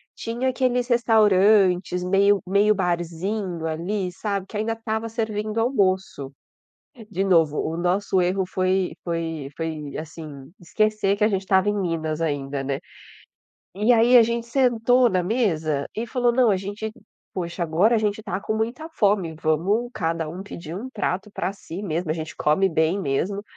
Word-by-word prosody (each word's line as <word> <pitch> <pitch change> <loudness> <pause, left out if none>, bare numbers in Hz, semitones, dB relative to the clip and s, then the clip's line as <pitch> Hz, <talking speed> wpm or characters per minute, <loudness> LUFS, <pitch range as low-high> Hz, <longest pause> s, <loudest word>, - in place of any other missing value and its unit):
tinha 240 +3 -2
aqueles 250 -1 0
restaurantes 205 -6 +3
meio 200 +2 +3
meio 200 +3 +3
barzinho 175 0 -2
ali, 180 +4 -2
sabe, 200 +1 -3
que 210 - -6
ainda 220 +2 -1
estava 225 0 -3
servindo 215 -1 -2
almoço. 190 - 0 0.8
De 195 0 -1
novo, 165 -6 +3
o 160 - -2
nosso 185 +2 +1
erro 185 +2 +1
foi 185 0 0
foi 165 -4 -3
foi, 155 -3 -5
assim, 155 -4 -9
esquecer 215 +2 +1
que 210 - +2
a - - +4
gente 195 -3 -1
estava 190 +1 +2
em - - -1
Minas 165 -5 -2
ainda, 145 -3 -2
né, 135 0 -2 0.9
e 210 +5 +1
aí 235 +2 +6
a - - +8
gente 235 +1 -1
sentou 245 0 +3
na 185 -4 +1
mesa, 165 - 0
e 225 +2 -2
falou: 245 0 +1
"Não, 245 -2 +4
a 195 - +3
gente 205 +3 -5 0.4
poxa, 175 -1 -4
agora 170 +8 +3
a - - +3
gente 215 0 -1
tá 190 -4 -3
com 220 - -2
muita 235 +8 -2
fome, 200 - +1
vamos 190 +10 +1
cada 165 -3 -2
um 175 +4 -6
pedir 170 -5 -8
um 245 +7 -6
prato 205 -3 -3
pra 190 - -2
si 195 -1 -8
mesmo, 170 -3 -2
a - - +1
gente 160 -1 -6
come 175 +6 +2
bem 160 +3 +1
mesmo". 190 +6 -1
195 Hz, 165 wpm, -23 LUFS, 165-220 Hz, 0.9 s, a